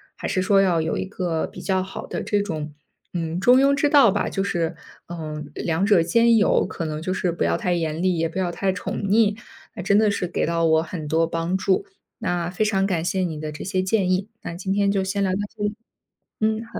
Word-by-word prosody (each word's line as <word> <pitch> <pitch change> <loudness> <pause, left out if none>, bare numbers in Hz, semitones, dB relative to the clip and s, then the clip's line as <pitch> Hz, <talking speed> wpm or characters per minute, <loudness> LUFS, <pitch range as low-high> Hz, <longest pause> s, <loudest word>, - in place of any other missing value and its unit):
还 - - -5
是 185 - 0
说 195 +1 +4
要 175 -4 +2
有 160 0 -1
一 - - -2
个 180 -4 -2
比 - - -10
较 190 -1 0
好 190 - -8
的 - - -4
这 205 -1 +1
种， 155 -6 -4 0.4
嗯， 165 -1 -2
中 245 +7 +6
庸 275 +1 +4
之 285 +1 +2
道 280 -6 +6
吧。 205 +1 0
就 195 - -2
是， 170 -4 -1 0.3
嗯， 155 -3 -6
两 170 +5 -1
者 200 -5 +5
兼 230 +7 +4
有， 210 - +3
可 165 - -5
能 155 0 -3
就 185 +3 -2
是 185 -1 0
不 170 - -2
要 - - +2
太 180 -6 0
严 160 -1 -2
厉， 185 -1 +1
也 165 0 +1
不 170 +4 -5
要 180 -2 0
太 190 +2 -1
宠 195 +2 -4
腻。 210 +1 +3 0.4
那 180 - -5
真 200 +3 +4
的 215 - +4
是 200 -3 -1
给 170 - -1
到 170 0 +1
我 160 0 +4
很 160 -2 -6
多 165 +2 +2
帮 165 +3 -2
助， 190 - +1 0.3
那 175 -6 -2
非 190 +4 0
常 195 -2 +1
感 170 -4 -1
谢 190 - 0
你 165 -4 -2
的 155 0 -5
这 150 - -7
些 185 -1 -1
建 190 -1 +1
议， 190 +3 0
那 170 - -6
今 190 +2 -2
天 200 0 +2
就 195 -1 +1
先 195 +1 -2
聊 190 - +1
到 185 - 0 0.2
这 210 - -5
里。 210 0 -1 0.6
嗯， 220 +1 0
好。 230 - -8
185 Hz, 265 characters per minute, -23 LUFS, 165-200 Hz, 0.6 s, 中